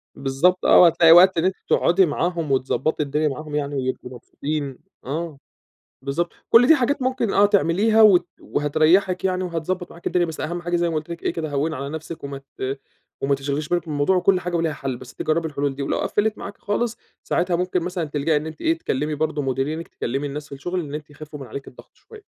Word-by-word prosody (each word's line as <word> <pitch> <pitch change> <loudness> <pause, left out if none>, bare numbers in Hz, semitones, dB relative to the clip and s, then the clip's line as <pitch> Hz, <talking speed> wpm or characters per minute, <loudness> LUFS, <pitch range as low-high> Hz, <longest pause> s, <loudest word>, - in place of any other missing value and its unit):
بالضبط 140 +8 +1
آه، - - +7
وهتلاقي 165 -1 +6
وقت 180 +1 +7
إن 165 - +2
أنتِ 190 - +1
تقعدي 180 +2 +4
معاهم 165 -1 -2
وتضبّطي 135 +4 0
الدنيا 150 +2 0
معاهم 150 +1 -5
يعني 145 -1 -2
ويبقوا 130 -1 -3
مبسوطين، 140 +2 -5 0.3
آه، 155 +2 -4 0.6
بالضبط، 145 +6 -2 0.2
كلّ 245 +2 +7
دي 320 - +8
حاجات 275 +1 0
ممكن 255 -4 0
آه 205 - +5
تعمليها 205 +3 +3
وت 180 -5 +6
وهتريّحِك 160 +6 +2
يعني 185 0 0
وهتضبَّط 175 +1 -3
معاكِ 170 - -7
الدنيا، 175 -1 +2
بس 160 -1 -7
أهم 175 +2 -3
حاجة 175 0 -1
زي 170 0 +1
ما 160 - -3
قُلت 155 +2 -3
لِك 170 0 -7
إيه - - 0
كده، 160 -2 -4
هوِّني 150 +3 -1
على 140 +1 -5
نفْسِك 160 +1 -7
وما 140 -1 -5 0.2
ت 135 +1 -3 0.4
وما 140 0 +2
تشغليش 140 +2 -3
بالِك 175 0 0
بالموضوع 150 +4 +1
وكلّ 180 +1 +3
حاجة 175 -1 -3
وليها 165 -2 0
حل، 135 -3 -4
بس 125 -1 -12
أنتِ - - -9
جرّبي 160 +1 0
الحلول 140 -2 -2
دي 140 - -5
ولو - - -1
قفّلِت 210 +1 0
معاكِ 200 - -8
خالص، 230 +3 -2 0.3
ساعتها 175 0 0
ممكن 180 +1 0
مثلًا 180 -1 -3
تلجأي 150 +1 0
إن 150 - -3
أنتِ 155 - -9
إيه، 330 0 +1
تكلّمي 150 - -2
برضه 155 0 -1
مديرينِك، 135 +5 -2
تكلّمي 135 +4 -3
الناس 150 +2 -6
في 140 - -7
الشغل، 175 +6 -3
إن 145 -3 -6
أنتِ 150 -1 -6
يخفوا 150 0 -10
من 135 - -8
عليكِ 135 +5 -8
الضغط - - -14
شوية. 440 - -15
160 Hz, 215 wpm, -22 LUFS, 145-180 Hz, 0.6 s, دي